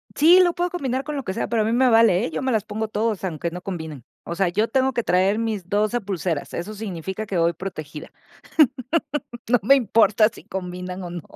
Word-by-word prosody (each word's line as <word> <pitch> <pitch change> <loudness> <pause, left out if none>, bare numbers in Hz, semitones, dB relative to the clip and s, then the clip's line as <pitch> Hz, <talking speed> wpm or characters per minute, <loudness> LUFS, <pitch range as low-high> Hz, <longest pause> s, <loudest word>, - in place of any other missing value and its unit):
Sí, 335 +5 +7
lo 350 - +2
puedo 350 +1 -1
combinar 265 -6 -2
con 300 0 -5
lo 275 - -3
que 190 - -4
sea. 230 - -2
Pero 230 -2 +1
a - - +1
mí 220 - 0
me 255 +2 +4
vale, 225 -3 +4
¿eh? - - -5
Yo - - -3
me 260 -1 0
las 220 -4 +1
pongo 220 +1 -4
todos, 215 -1 -2
aunque 170 -2 -3
no 180 +1 -7
combinen. 160 -8 -6 0.2
O 170 - -5
sea, 185 -1 +1
yo 210 +5 +1
tengo 265 +3 +1
que 235 - -1
traer 190 +4 +2
mis 215 -6 -3
12 215 +4 +1
pulseras. 180 -6 -3
Eso 180 +5 -5
significa 195 -1 -5
que 195 -4 -3
voy 170 0 +2
protegida. 155 -4 -7 1.4
No 245 +1 +4
me 270 +7 +6
importa 220 -3 +4
si - - -15
combinan 180 0 -6
o 175 - -6
no. 175 -1 -6
205 Hz, 225 wpm, -23 LUFS, 180-230 Hz, 1.4 s, Sí